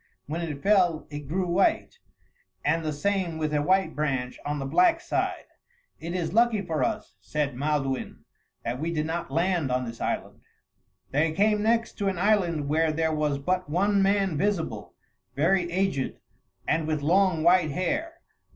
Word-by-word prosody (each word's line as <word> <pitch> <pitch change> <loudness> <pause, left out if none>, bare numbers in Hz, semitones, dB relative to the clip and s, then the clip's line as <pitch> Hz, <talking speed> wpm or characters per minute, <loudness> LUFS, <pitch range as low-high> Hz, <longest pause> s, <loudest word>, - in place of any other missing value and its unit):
When 160 +4 -4
it 150 -4 -5
fell, 185 -6 +3
it 145 -1 -7
grew 180 +5 -1
white; 190 - +1 0.7
and 165 +2 +2
the 155 - -1
same 180 +1 -1
with 155 -1 -2
a 150 - +2
white 190 +5 +2
branch 135 -4 -2
on 145 0 -2
the 135 - -4
black 335 - +4
side. - - -2 0.5
"It 170 +2 -5
is 170 -2 -2
lucky 230 -2 +3
for 160 -4 -1
us," 215 - -3
said 140 +8 -2
Maelduin, 135 -1 -2 0.4
"that 120 +2 -3
we 165 +3 -2
did 155 -2 -1
not 165 -1 -3
land 165 -1 0
on 125 0 0
this 115 -1 -8
island." - - -3 0.7
They 155 +3 +1
came 210 +4 +2
next 230 +1 0
to 200 - 0
an 190 -2 -1
island 175 -6 +1
where 160 +2 +2
there 160 0 0
was 150 -2 0
but 180 +4 -1
one 200 +5 +2
man 195 -5 +2
visible, 200 -4 -2 0.4
very 175 +4 +2
aged, 185 -7 0 0.5
and 155 0 +1
with 155 -2 -1
long, 180 0 +3
white 175 -1 +5
hair. 290 - -2
165 Hz, 170 wpm, -26 LUFS, 150-195 Hz, 0.7 s, white